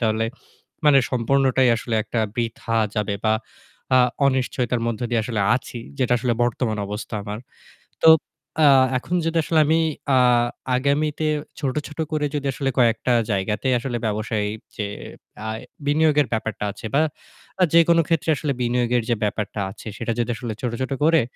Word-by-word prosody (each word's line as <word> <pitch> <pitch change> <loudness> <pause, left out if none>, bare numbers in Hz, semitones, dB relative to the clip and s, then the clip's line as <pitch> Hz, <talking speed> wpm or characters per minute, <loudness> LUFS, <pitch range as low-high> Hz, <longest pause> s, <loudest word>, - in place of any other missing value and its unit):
তাহলে 110 -1 +1 0.6
মানে 145 -2 +7
সম্পূর্ণটাই 130 +1 +2
আসলে 115 0 -3
একটা 115 +1 -3 0.2
বৃথা 115 -1 -2 0.2
যাবে 105 -2 -1
বা 110 - +4 0.6
আ - - +7 0.3
অনিশ্চয়তার 125 -2 0
মধ্য 115 -1 -3
দিয়ে 115 -2 +1
আসলে 110 -3 -2
আছি 125 -1 -6 0.2
যেটা 125 -2 +2
আসলে 120 0 0
বর্তমান 115 -2 -1
অবস্থা 105 +2 -6
আমার। 105 +1 -5 0.6
তো 160 - +7 0.6
আ - - +7 0.3
এখন 170 +8 -3
যদি 165 0 0
আসলে 160 +1 +2
আমি 160 +2 +3 0.4
আ - - +5 0.6
আগামীতে 150 +3 0 0.3
ছোট, 135 -3 -2
ছোট 150 +2 -13
করে 155 -1 0
যদি 140 -1 -2
আসলে 135 +1 -1
কয়েকটা 120 0 +3 0.2
জায়গাতে 100 +4 -1
আসলে 120 0 -3
ব্যবসায় 110 0 -1 0.3
যে 105 - -2 0.6
আ - - -2 0.4
বিনিয়োগের 150 -2 +3
ব্যাপারটা 110 -2 -3
আছে 105 - -11
বা 140 - +4 0.6
আ - - +7
যেকোনো 170 0 +5
ক্ষেত্রে 165 -1 0
আসলে 145 +2 -2
বিনিয়োগের 120 0 +1
যে 120 - +3
ব্যাপারটা 105 0 -2
আছে 100 - -12
সেটা 115 0 -2
যদি 120 - 0
আসলে 115 -1 -5
ছোট, 125 - -1
ছোট 130 - -2
করে, 160 +1 +5
125 Hz, 155 wpm, -22 LUFS, 110-140 Hz, 0.6 s, মানে